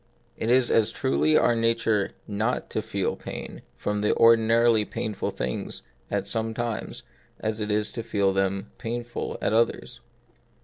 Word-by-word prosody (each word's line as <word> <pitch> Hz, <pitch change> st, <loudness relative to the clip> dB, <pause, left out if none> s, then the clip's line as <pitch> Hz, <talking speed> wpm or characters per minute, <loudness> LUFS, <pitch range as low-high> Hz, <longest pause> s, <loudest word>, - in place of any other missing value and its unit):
It 110 Hz, -, -3 dB
is 125 Hz, 0 st, +4 dB
as 110 Hz, -2 st, +4 dB
truly 70 Hz, +3 st, +2 dB
our 120 Hz, -, +3 dB
nature 115 Hz, -3 st, +1 dB
not 110 Hz, +4 st, -1 dB
to 110 Hz, -, -1 dB
feel 100 Hz, -3 st, -2 dB
pain -, -, -7 dB, 0.2 s
from 105 Hz, 0 st, -2 dB
the 105 Hz, -, +2 dB
ordinarily 115 Hz, 0 st, +5 dB
painful 105 Hz, 0 st, -3 dB
things 60 Hz, 0 st, -4 dB, 0.3 s
at -, -, -1 dB
some 110 Hz, 0 st, -2 dB
times, 120 Hz, -2 st, -4 dB, 0.4 s
as 110 Hz, 0 st, -2 dB
it 105 Hz, 0 st, -2 dB
is 105 Hz, 0 st, 0 dB
to 115 Hz, -, -4 dB
feel 100 Hz, -3 st, +1 dB
them 95 Hz, +1 st, -1 dB
painful 120 Hz, 0 st, -4 dB
at -, -, +1 dB
others. 115 Hz, +1 st, 0 dB
110 Hz, 150 wpm, -26 LUFS, 100-115 Hz, 0.4 s, ordinarily